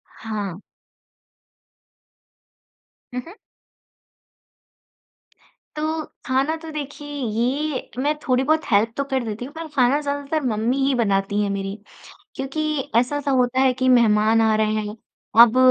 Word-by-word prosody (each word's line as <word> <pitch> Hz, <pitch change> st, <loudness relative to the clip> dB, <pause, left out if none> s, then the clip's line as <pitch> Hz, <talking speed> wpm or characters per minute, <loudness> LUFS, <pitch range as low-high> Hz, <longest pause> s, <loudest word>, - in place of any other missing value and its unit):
हाँ। 205 Hz, -5 st, -5 dB, 2.5 s
हुँ, 250 Hz, -, -2 dB
हुँ। 400 Hz, +6 st, -12 dB, 2.4 s
तो, 310 Hz, +1 st, -2 dB, 0.2 s
खाना 270 Hz, +5 st, +1 dB
तो 320 Hz, 0 st, -10 dB
देखिए 290 Hz, 0 st, -6 dB
ये 255 Hz, +4 st, -1 dB
मैं 295 Hz, +2 st, +1 dB
थोड़ी 255 Hz, +1 st, +3 dB
बहुत 315 Hz, +3 st, +2 dB
हेल्प 220 Hz, +3 st, +3 dB
तो 280 Hz, -, +1 dB
कर 260 Hz, -2 st, +1 dB
देती 225 Hz, +2 st, -5 dB
हूँ 285 Hz, -, -11 dB
पर 325 Hz, 0 st, -6 dB
खाना 260 Hz, +3 st, +4 dB
ज़्यादातर 285 Hz, +2 st, -2 dB
मम्मी 225 Hz, +4 st, 0 dB
ही 275 Hz, -, +2 dB
बनती 200 Hz, -2 st, +1 dB
हैं 205 Hz, -, 0 dB
मेरी। 195 Hz, +1 st, -3 dB, 0.6 s
क्योंकि 290 Hz, +1 st, -2 dB
ऐसा-सा 280 Hz, +4 st, +1 dB
होता 255 Hz, 0 st, +2 dB
है 265 Hz, -1 st, +4 dB
कि 260 Hz, +1 st, 0 dB
मेहमान 225 Hz, -2 st, +4 dB
आ 220 Hz, -1 st, +3 dB
रहे 215 Hz, 0 st, +1 dB
हैं, 210 Hz, 0 st, -3 dB, 0.4 s
अब 235 Hz, +1 st, +8 dB
255 Hz, 130 wpm, -22 LUFS, 220-290 Hz, 2.5 s, अब